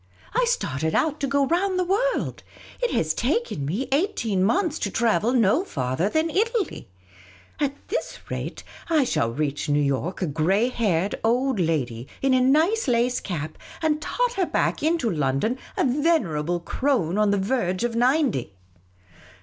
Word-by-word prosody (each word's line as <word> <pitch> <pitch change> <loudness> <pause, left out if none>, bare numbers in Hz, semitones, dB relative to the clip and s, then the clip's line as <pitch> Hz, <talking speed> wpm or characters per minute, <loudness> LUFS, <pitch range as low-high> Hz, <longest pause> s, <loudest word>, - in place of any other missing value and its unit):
" - - -26
I - - +3
started 160 - -1
out 310 -1 +1
to 280 - -1
go 280 0 +2
round 365 +5 +1
the 365 - +2
world; 445 +8 0 0.4
it - - +1
has - - 0
taken 455 - -1
me 210 - -2
eighteen 265 - +1
months 320 - +1
to 205 - -1
travel 230 +2 +1
no 240 - +3
farther 130 - -1
than 315 +5 0
Italy! 435 - -1 0.7
At 280 -1 0
this 455 - -3
rate, - - -5 0.3
I 315 -4 +4
shall 115 - 0
reach 145 +3 -2
New 145 0 +3
York 145 +7 -1
a - - +2
grey 180 - +1
haired 200 -6 0
old 245 +1 +1
lady, 135 -8 -1
in 270 -1 +2
a 255 - +4
nice 315 - +3
lace 245 0 +2
cap, 155 -4 -5 0.2
and 305 -1 +1
totter 480 -3 0
back - - 0
into 320 -4 +1
London 150 - 0 0.2
a - - +2
venerable 245 - +1
crone 205 - 0
on 210 -1 +3
the 200 - +2
verge 190 -2 0
of 240 -1 -1
ninety." 245 - +1
240 Hz, 160 wpm, -24 LUFS, -, 0.7 s, I